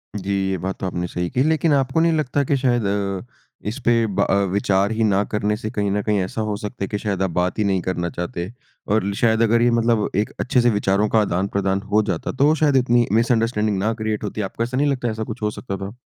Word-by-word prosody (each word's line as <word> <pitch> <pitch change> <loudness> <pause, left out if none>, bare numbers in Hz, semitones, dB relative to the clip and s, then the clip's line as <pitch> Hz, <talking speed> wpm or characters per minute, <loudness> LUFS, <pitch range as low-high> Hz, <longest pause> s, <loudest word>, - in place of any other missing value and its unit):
जी 100 -1 -2 0.2
ये 95 - -1
बात 95 +1 -3
तो - - -3
आपने 90 -1 -2
सही 90 0 -3
की। 130 - +1
लेकिन 160 0 +2
आपको 135 +3 +1
नहीं 165 0 +3
लगता 145 -2 0
कि 140 - +1
शायद 120 -4 +1
अ, 100 -1 -1 0.5
इस 115 +6 -3
पे 115 -1 +3
ब 100 -1 0
अ, - - +3 0.2
विचार 100 +1 +1
ही 110 0 0
ना 100 -1 +3
करने 105 0 0
से 110 -1 -5
कहीं 100 -4 -1
ना 105 - 0
कहीं 105 -1 0
ऐसा 110 +4 -4
हो 105 - -1
सकता 105 0 -6
है 95 - -1
कि 105 - -3
शायद 100 -3 -2
आप 95 - +1
बात 90 +5 -1
ही - - +3
नहीं 95 -3 +1
करना 85 -1 -2
चाहते। 90 +2 -5 0.4
और 105 -1 +2
ल 100 - -1
शायद 115 -1 +3
अगर 115 +1 +3
ये 120 - +4
मतलब 115 -2 +2
एक 105 +2 0
अच्छे 125 -1 +2
से 120 - +4
विचारों 105 -1 +1
का 110 - +3
आदान-प्रदान 95 0 0
हो 105 - +4
जाता 85 - -3
तो 140 +4 +3
शायद 150 -3 +2
इतनी 120 -2 +3
मिसअंडरस्टैंडिंग 115 -2 +1
ना 110 +3 0
क्रिएट 110 -1 -2
होती। 105 +1 -3
आपको 115 - -3
ऐसा 125 +2 -3
नहीं 145 +2 +2
लगता 125 -3 -1
ऐसा 110 0 -3
कुछ 110 0 -7
हो 105 - 0
सकता 100 -3 -6
था? 100 +4 -7
105 Hz, 255 wpm, -21 LUFS, 100-120 Hz, 0.5 s, ये